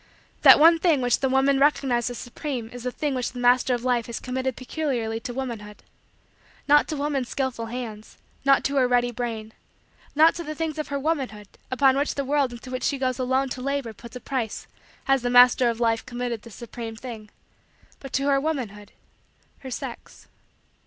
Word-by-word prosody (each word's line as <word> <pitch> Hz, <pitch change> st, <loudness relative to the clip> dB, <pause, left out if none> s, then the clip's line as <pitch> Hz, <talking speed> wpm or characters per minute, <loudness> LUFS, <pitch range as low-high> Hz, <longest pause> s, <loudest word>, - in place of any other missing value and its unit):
That -, -, +9 dB
one 330 Hz, +2 st, +7 dB
thing 325 Hz, -5 st, +3 dB
which 245 Hz, -2 st, +1 dB
the 265 Hz, -, +1 dB
woman 270 Hz, +1 st, +3 dB
recognized 270 Hz, -4 st, +2 dB
as 245 Hz, -, -6 dB
supreme 245 Hz, -2 st, -5 dB
is 245 Hz, -, -8 dB
the 250 Hz, +1 st, -3 dB
thing 295 Hz, +2 st, -2 dB
which 250 Hz, -2 st, -2 dB
the 250 Hz, -, -7 dB
Master 245 Hz, +1 st, +3 dB
of 240 Hz, -, -6 dB
Life 245 Hz, -2 st, +1 dB
has 235 Hz, -, -5 dB
committed 260 Hz, 0 st, -3 dB
peculiarly 250 Hz, -5 st, -3 dB
to 245 Hz, -, -6 dB
womanhood. 235 Hz, -5 st, -6 dB, 0.8 s
Not 295 Hz, 0 st, +5 dB
to 310 Hz, -, -3 dB
woman's 280 Hz, -3 st, -2 dB
skillful 260 Hz, -4 st, -3 dB
hands; 225 Hz, -3 st, -7 dB, 0.3 s
not 275 Hz, 0 st, +4 dB
to 280 Hz, 0 st, -1 dB
her 255 Hz, -2 st, +4 dB
ready 245 Hz, 0 st, +2 dB
brain; 225 Hz, -2 st, -5 dB, 0.6 s
not 315 Hz, +2 st, +6 dB
to 340 Hz, -, -6 dB
the 310 Hz, -1 st, -6 dB
things 315 Hz, -1 st, -3 dB
of 305 Hz, -, -3 dB
her 285 Hz, -1 st, -2 dB
womanhood 265 Hz, -9 st, -3 dB, 0.2 s
upon 265 Hz, +1 st, +3 dB
which 285 Hz, +2 st, 0 dB
the 280 Hz, -, -2 dB
world 280 Hz, -2 st, +1 dB
into 240 Hz, +1 st, -10 dB
which 255 Hz, -, -3 dB
she 280 Hz, -, +1 dB
goes 255 Hz, -1 st, -1 dB
alone 260 Hz, +1 st, +1 dB
to 255 Hz, -, -5 dB
labor 275 Hz, -3 st, -2 dB
puts 235 Hz, +3 st, -13 dB
a -, -, -5 dB
price 245 Hz, -5 st, -3 dB, 0.4 s
has 270 Hz, -1 st, +2 dB
the 245 Hz, -, -1 dB
Master 245 Hz, 0 st, +6 dB
of 230 Hz, -1 st, -3 dB
Life 230 Hz, -1 st, +1 dB
committed 245 Hz, -2 st, -4 dB
this 230 Hz, -2 st, -13 dB
supreme 230 Hz, -1 st, -7 dB
thing; 220 Hz, -2 st, -9 dB, 0.7 s
but 270 Hz, -, -9 dB
to 275 Hz, -, +1 dB
her 275 Hz, -1 st, +3 dB
womanhood 240 Hz, -10 st, -4 dB, 0.7 s
her 265 Hz, -, -8 dB
sex. 250 Hz, -, -8 dB
255 Hz, 195 wpm, -25 LUFS, 235-275 Hz, 0.8 s, That